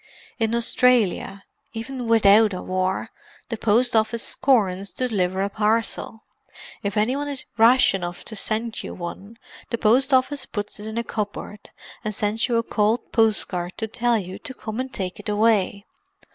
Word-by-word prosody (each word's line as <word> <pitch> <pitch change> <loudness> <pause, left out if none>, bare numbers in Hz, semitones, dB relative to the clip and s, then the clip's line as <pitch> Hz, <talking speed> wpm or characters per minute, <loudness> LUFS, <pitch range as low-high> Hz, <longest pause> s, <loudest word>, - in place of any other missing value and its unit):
In 225 0 +1
Australia, 230 -5 +2 0.3
even 245 +2 -5
without 215 -1 +5
a 180 - -4
war, 185 0 -1 0.4
the 230 - -2
post 230 +3 +2
office 220 +1 +1
scorns 200 -7 +1
to 255 - -1
deliver 190 -4 0
a 200 - -1
parcel; 220 +1 -1 0.6
if 200 0 -3
any 220 +5 +2
one 290 +1 -3
is 280 -2 -6
rash 235 +2 +5
enough 175 -2 -4
to 220 - -7
send 220 +2 -2
you - - -7
one 195 +5 -8 0.3
the 235 - -1
post 250 +6 +3
office 260 +2 +2
puts 205 -1 -5
it 210 - -6
in 220 +1 -5
a 235 - 0
cupboard 210 -1 -5 0.3
and 215 -1 -2
sends 215 +3 +1
you 240 - 0
a 230 - +1
cold 220 +2 0
postcard 195 -5 0
to 220 - -2
tell 240 +1 +1
you 185 -2 -6
to 260 - -8
come 220 0 -6
and 260 0 -3
take 185 -5 -4
it - - -6
away. 210 -2 +2
220 Hz, 170 wpm, -23 LUFS, 200-235 Hz, 0.6 s, without